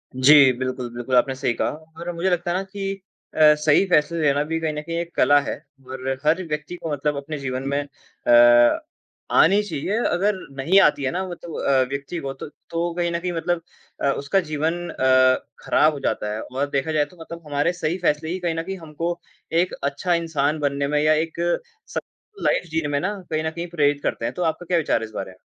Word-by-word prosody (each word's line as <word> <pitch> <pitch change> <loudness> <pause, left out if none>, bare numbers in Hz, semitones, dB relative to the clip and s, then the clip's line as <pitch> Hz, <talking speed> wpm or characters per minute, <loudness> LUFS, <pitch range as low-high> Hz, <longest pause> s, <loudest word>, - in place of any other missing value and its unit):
जी, 135 +1 +7
बिल्कुल, 130 0 -4
बिल्कुल, 120 +1 -2
आपने 130 +2 +3
सही 125 -2 0
कहा। - - -1
और 160 +3 -8
मुझे 170 +3 0
लगता 175 -1 0
है 175 - +1
ना 190 - -2
कि 195 0 -5 0.3
अ, - - -4 0.2
सही 150 +4 +3
फैसले 165 0 +2
लेना 145 -1 +2
भी 165 +2 -2
कहीं 160 -1 -2
न 150 - -4
कहीं 165 +2 -5
एक 170 0 -5
कला 145 0 +5
है 140 - -3 0.3
और 130 0 -5 0.2
हर 160 +4 +3
व्यक्ति 150 +2 -4
को 165 - -5
मतलब 145 +1 -1
अपने 145 +2 -5
जीवन 130 -1 -3
में - - +1
अ, 120 -4 +4 0.5
आनी 200 +5 +5
चाहिए। 205 +2 -2
अगर 200 +3 +1 0.2
नहीं 165 +9 +4
आती 150 -4 +3
है 130 - 0
ना, 185 +2 -2
वत 175 -1 -9
अ, 140 -5 +1
व्यक्ति 140 +5 -4
को 135 -3 -4
तो 135 +2 -9 0.2
तो 165 - -2
वो 175 0 -2
कहीं 175 0 -1
न 170 - -1
कहीं 180 +1 -3
मतलब 170 0 -1 0.4
अ, - - +2
उसका 140 +8 +1
जीवन 165 +4 -1
अ, 130 -2 +3
खराब 155 +1 +3
हो 145 - -6
जाता 105 -5 -2
है 110 - -4
और 135 +3 -3
देखा 140 +3 -1
जाए 150 -1 +2
तो 180 +5 -19
मतलब 170 0 -9
हमारे 145 +4 +1
सही 170 0 -2
फैसले 160 -3 0
ही 180 +2 -2
कहीं 170 -2 -1
न 165 - -2
कहीं 190 +2 -5
हमको 165 +1 -4 0.4
एक 180 - -2
अच्छा 140 +6 0
इंसान 155 -3 0
बनने 140 -1 0
में 150 0 +1
या 155 0 +5
एक 160 +2 -2 0.5
स - - -7 0.4
लाइफ - - +2
जीने 160 -2 0
में 145 -1 0
ना 195 +6 -1 0.2
कहीं 155 0 -1
न 160 - 0
कहीं 170 +2 -5
प्रेरित 145 -4 +1
करते 115 - -2
हैं। - - -2
तो 180 - -3
आपका 165 +1 -1
क्या 175 0 +1
विचार 160 - +1
है - - -3
इस 110 - -13
बारे 95 - -5
में? 90 - -18
155 Hz, 230 wpm, -23 LUFS, 140-170 Hz, 0.5 s, जी